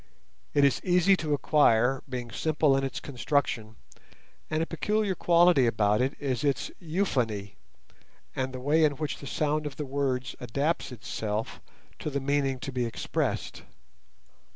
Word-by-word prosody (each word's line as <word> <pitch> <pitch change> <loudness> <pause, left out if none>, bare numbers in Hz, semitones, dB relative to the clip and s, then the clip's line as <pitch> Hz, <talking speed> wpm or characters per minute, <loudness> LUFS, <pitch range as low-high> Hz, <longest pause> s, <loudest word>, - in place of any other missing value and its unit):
It 145 - +5
is 140 -2 +3
easy 180 +1 +4
to 150 -4 0
acquire, 135 -3 +3
being 125 -2 -5
simple 150 -1 +2
in 135 - 0
its 135 - -3
construction, 125 -5 -1 0.7
and 155 +1 0
a - - -1
peculiar 210 +4 0
quality 170 -7 +4
about 105 -1 +2
it 130 +3 0
is 130 -3 -2
its 140 -4 0
euphony, 125 - -1 0.8
and 130 0 -2
the 130 - -6
way 150 +5 +3
in 150 -2 +4
which 150 +1 -4
the 140 - -8
sound 150 +1 0
of 140 - -7
the 150 - -4
words 130 -3 -2
adapts 140 +7 -1
itself 110 -1 -4 0.4
to - - -3
the 140 -1 -1
meaning 135 -1 0
to 135 - -4
be 125 -1 -1
expressed. 115 -1 -2
140 Hz, 150 wpm, -28 LUFS, 125-155 Hz, 0.8 s, It